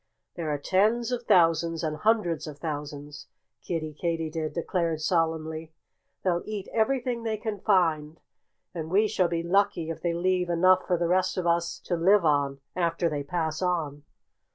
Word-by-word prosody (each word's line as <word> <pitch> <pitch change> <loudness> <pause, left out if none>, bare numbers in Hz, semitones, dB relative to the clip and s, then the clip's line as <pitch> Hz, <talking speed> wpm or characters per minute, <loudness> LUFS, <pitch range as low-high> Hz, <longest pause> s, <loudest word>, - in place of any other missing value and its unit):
"There 165 -3 -4
are 145 - 0
tens 215 - +1
of 240 -1 -3
thousands 165 -3 +3
and 155 -1 -2
hundreds 175 -5 +1
of 150 -2 -8
thousands," 145 -1 -6 0.3
Kiddie 155 -3 -3
Katydid 160 -1 -2
declared 170 -2 -1
solemnly. 160 -1 -1 0.5
"They'll 175 -2 +1
eat 210 -2 -5
everything 245 +1 0
they 220 -1 -2
can 210 -2 -4
find. 165 -6 +1 0.5
And 160 -2 -5
we 205 +5 +3
shall 190 -4 +1
be 170 -1 -2
lucky 175 -2 +1
if 165 - -7
they 170 -1 -1
leave 180 0 0
enough 185 +2 +4
for 180 - +2
the 170 0 0
rest 185 +2 +1
of 180 - -1
us 170 0 +1
to 175 - -2
live 185 +2 +4
on, 140 -2 +1
after 170 -1 0
they 150 -2 -2
pass 160 +2 -2
on." 160 -6 -1
170 Hz, 165 wpm, -27 LUFS, 155-185 Hz, 0.5 s, enough